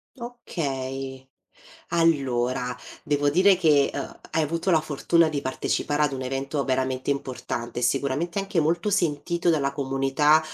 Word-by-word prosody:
Okay, 135 - -5 0.6
allora 130 -7 +1 0.3
devo 145 -2 +1
dire 185 +5 +5
che, 150 -6 +4
uhm, 140 - -6
hai 160 0 +1
avuto 165 +5 -1
la 160 - +4
fortuna 160 +2 +2
di 145 -2 -2
partecipare 145 +2 -1
ad 145 -2 +2
un 130 - -4
evento 135 +2 -2
veramente 130 0 -1
importante, 125 -3 -4
e - - -6
sicuramente 140 +8 0
anche 195 -3 0
molto 170 +7 +1
sentito 170 -1 +1
dalla 140 -4 +1
comunità, 140 +2 +2
145 Hz, 135 wpm, -25 LUFS, 135-165 Hz, 0.6 s, dire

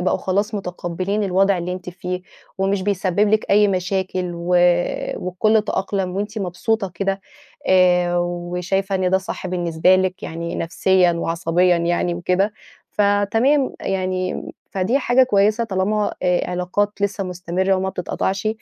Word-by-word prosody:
بقوا 180 - +1
خلاص 205 +4 -1
متقبلين 185 +2 -3
الوضع 195 0 +2
اللي 175 +1 -3
أنتِ 180 0 -6
فيه، 180 0 -5 0.4
ومش 195 0 0
بيسبب 200 0 +1
لِك 215 +1 +1
أي 205 0 +5
مشاكل 185 -1 -1
و 170 +1 -6 0.7
والكل 210 +4 +1
تأقلم 190 -3 -2
وأنتِ 205 +3 -3
مبسوطة 195 +2 -1
كده، 195 +1 -1 0.5
آآ، 180 -1 +4
وشايفة 180 +3 -2
إن 185 -1 +1
ده 190 - +4
صح 190 0 -6
بالنسبة 175 0 +2
لِك، 185 0 -1
يعني 170 +1 -5
نفسيًا 180 +1 +2
وعصبيًا 170 +1 +1
يعني 175 +1 0
وكده، 180 +4 0 0.4
فتمام، 225 +7 +2
يعني 185 -1 -2 0.3
فدي 195 +8 +1
حاجة 255 -1 +4
كويسة 215 -1 +2
طالما 205 0 0
آآ 180 0 +1
علاقات 180 +3 0
لسه 200 -1 -1
مستمرة 180 +1 -1
وما 190 0 -1
بتتقطعش. 190 +2 -2
185 Hz, 135 wpm, -21 LUFS, 180-200 Hz, 0.7 s, أي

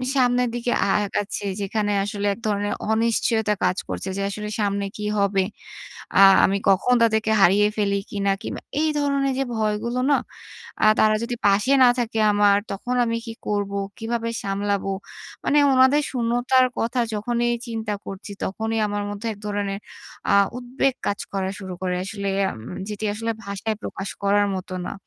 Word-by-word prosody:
সামনের 250 -1 +3
দিকে 240 0 -1
আ - - 0 0.2
আগাচ্ছে 205 +1 -3 0.2
যেখানে 205 +1 -1
আসলে 205 0 -3
এক 215 - -11
ধরনের 205 0 0 0.2
অনিশ্চয়তা 220 -1 +1
কাজ 180 +1 +2
করছে 190 - -4
যে - - -1
আসলে 210 +1 -5
সামনে 200 -1 0
কী 210 - -4
হবে? 195 -1 +2 0.7
আ - - +5 0.3
আমি 195 +1 +1
কখন 195 +6 +3
তাদেরকে 220 -1 +2
হারিয়ে 200 +3 +5
ফেলি 200 -1 +1
কী 205 - -6
না? 195 - +4
কিংবা - - -5 0.2
এই 315 - +2
ধরনের 280 -1 +1
যে 270 - +2
ভয়গুলো 220 +3 -1
না 280 - +5 0.7
আ - - +6
তারা 215 0 +5
যদি 240 +1 -3
পাশে 205 +6 +3
না 250 - +8
থাকে 225 -2 -1
আমার 205 -1 +4
তখন 245 +6 -3
আমি 230 0 -1
কী 225 - -6
করবো? 200 -1 -1 0.2
কীভাবে 230 0 -2
সামলাবো? 200 0 -1 0.5
মানে 295 - +2 0.2
উনাদের 260 +3 +5
শূন্যতার 245 +1 +2
কথা 235 +2 -1
যখনই 240 +3 0 0.2
চিন্তা 225 -2 -3
করছি 195 +2 -8
তখনই 220 +3 -2
আমার 205 0 -2
মধ্যে 205 +3 -5
এক 205 - -15
ধরনের 200 -1 -2 0.5
আ - - +4 0.2
উদ্বেগ 255 +2 0
কাজ 205 - -1
করা 190 -1 -1
শুরু 190 -2 -6
করে 180 -1 -1
আসলে 200 -1 -4 0.3
উম 115 +10 -8
যেটি 210 +1 -4
আসলে 225 +2 -2
ভাষায় 200 +2 -3
প্রকাশ 195 0 -5
করার 205 +1 +3
মত 185 0 -6 0.2
না। - - -4
210 Hz, 170 wpm, -23 LUFS, 200-235 Hz, 0.7 s, না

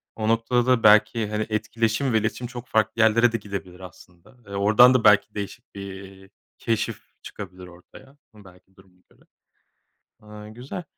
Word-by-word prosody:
o 110 -1 -3
noktada 115 +2 +1
da 125 -2 +2
belki, 110 +1 +4
hani, 105 0 -2
etkileşim 115 +4 -1
ve 110 - +3
iletişim 115 +3 -4
çok 125 0 -10
farklı 110 +1 0
yerlere 115 +2 +4
de 115 - -1
gidebilir 95 -4 -8
aslında. 90 +4 -16
Eee, 100 - -10
oradan 110 +5 +5
da 130 -3 +1
belki 105 0 +4
değişik 100 0 -8
bir 95 -1 -10 0.3
keşif 115 -1 -3 0.2
çıkabilir 90 -2 -10
ortaya. 90 +10 -17 0.2
Hımm, 105 - -17
belki 90 +1 -20
duruma 95 -1 -23
göre. - - -28 1.0
Aaa, 105 0 -12
güzel. 125 +10 -8
105 Hz, 160 wpm, -23 LUFS, 100-115 Hz, 1.0 s, oradan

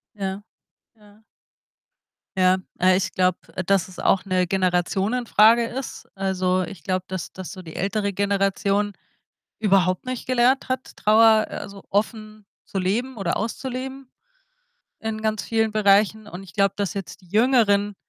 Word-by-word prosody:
Ja, 195 0 -4 0.5
ja. 210 0 -22 1.1
Ja, 185 0 +4 0.2
aber 185 +1 +4
ich 190 0 -1
glaube, 185 -1 +1 0.3
dass 195 -2 +2
es 185 - -14
auch 190 0 +2
'ne 185 -2 +1
Generationenfrage 205 +5 +3
ist. 260 +2 -6
Also, 185 -1 0
ich 180 -4 -8
glaube, 185 -1 -1
dass 185 -2 -5
dass 185 -2 -8
so 190 - -9
die 160 -2 -11
ältere 200 +1 -1
Generation 200 +1 0 0.7
überhaupt 190 -1 +2
nicht 255 -1 -4
gelernt 255 +2 +2
hat, 255 0 -4
Trauer, 220 0 +5
also, 200 -1 -8
offen 215 0 -2 0.2
zu 195 - -6
leben 230 +8 -1
oder 195 -5 -1
auszuleben 260 +3 -5 0.9
in 220 0 -4
ganz 215 -1 -1
vielen 225 -1 +1
Bereichen. 210 +1 +3
Und 190 -1 -9
ich 180 -3 -13
glaube, 195 -1 +2
dass 200 -1 -2
jetzt 195 0 -7
die 180 - -21
Jüngeren, 210 -3 +3
200 Hz, 145 wpm, -23 LUFS, 190-220 Hz, 1.1 s, Trauer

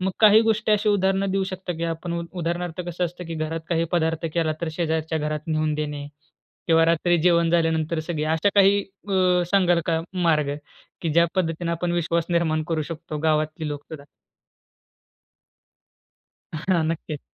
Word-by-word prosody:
मग 190 +1 0
काही 215 0 +8
गोष्टी 215 0 +1
अशी 210 +1 +2
उदाहरण 195 -1 +2
देऊ 195 -1 +1
शकता, 185 -1 -5
की 170 - -2
आपण 170 +1 -4
उदाहरणार्थ 175 0 -3
कसं 175 +1 -2
असतं, 175 +1 -6
की 165 - -5
घरात 160 +1 -3
काही 165 -1 +1
पदार्थ 165 -1 0
केला, 165 -2 +1
तर 170 - -2
शेजारच्या 160 -1 -1
घरात 150 0 -2
नेवून 155 -1 0
देणे. 150 -1 -4 0.6
किंवा 165 0 +5
रात्री 170 +1 +3
जेवण 170 -2 +4
झाल्यानंतर 165 -1 +1
सगळे 155 -2 -3
अशा 160 +5 +2
काही 200 0 +5 0.3
अ, 195 - 0 0.4
सांगाल 180 -3 +3
का 165 -1 +1 0.2
मार्ग? 150 -4 +2 0.5
की 165 - -1
ज्या 170 +2 +5
पद्धतीने 170 -1 -1
आपण 170 +1 -1
विश्वास 170 -1 0
निर्माण 160 -2 +1
करू 160 -2 0
शकतो 155 -1 -6
गावातली 155 0 0
लोकसुद्धा? 145 0 -7 2.5
हां. 170 +2 0
नक्कीच. 155 -2 -4
165 Hz, 155 wpm, -24 LUFS, 155-175 Hz, 2.5 s, काही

